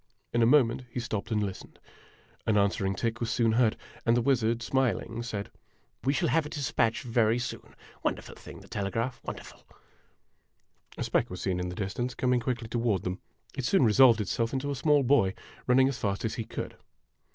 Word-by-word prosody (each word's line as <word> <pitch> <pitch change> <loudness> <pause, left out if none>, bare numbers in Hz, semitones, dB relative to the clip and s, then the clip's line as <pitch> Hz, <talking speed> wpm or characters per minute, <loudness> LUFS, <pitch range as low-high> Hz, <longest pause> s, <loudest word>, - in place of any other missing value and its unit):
In 120 - +2
a 115 - +5
moment 125 -2 +4
he 120 - -4
stopped 110 -4 -3
and 105 -2 +1
listened. 95 -2 -6 0.7
An 110 - +3
answering 100 -1 +1
46 - - -9
IMAGINOTIONS - - -18
tick - - -14
was 115 - -2
soon 115 -1 +2
heard; 115 -1 +3 0.3
and 115 0 +3
the - - +3
wizard, 120 -3 +1
smiling, 115 -2 0
said: 105 -4 -5 0.5
"We 135 - +2
shall 165 +3 +1
have 165 - +3
a 150 - -7
despatch 125 -6 0
very 115 -2 +2
soon! 125 0 -6 0.3
Wonderful - - -3
thing, - - -12
the - - -15
telegraph 115 +5 -3
wonderful! - - -8 0.7
' - - -29
A - - -2
speck - - +1
was 90 - -6
seen 90 -2 -1
in 90 0 -2
the 90 - -6
distance 110 +6 -3
coming 125 -1 +2
quickly 120 -1 -3
toward 115 -5 0
them. 90 +2 -3 0.4
It 135 - -3
soon 130 +2 +4
resolved 115 +1 +6
itself 115 +4 -1
into 140 +2 -1
a - - -2
small 145 +1 +3
boy, 120 -7 +3 0.3
running 130 +1 +5
as 135 - -3
fast 100 +1 -1
as 110 - -1
he 115 -3 -4
could. - - -6
115 Hz, 200 wpm, -29 LUFS, 105-125 Hz, 0.7 s, resolved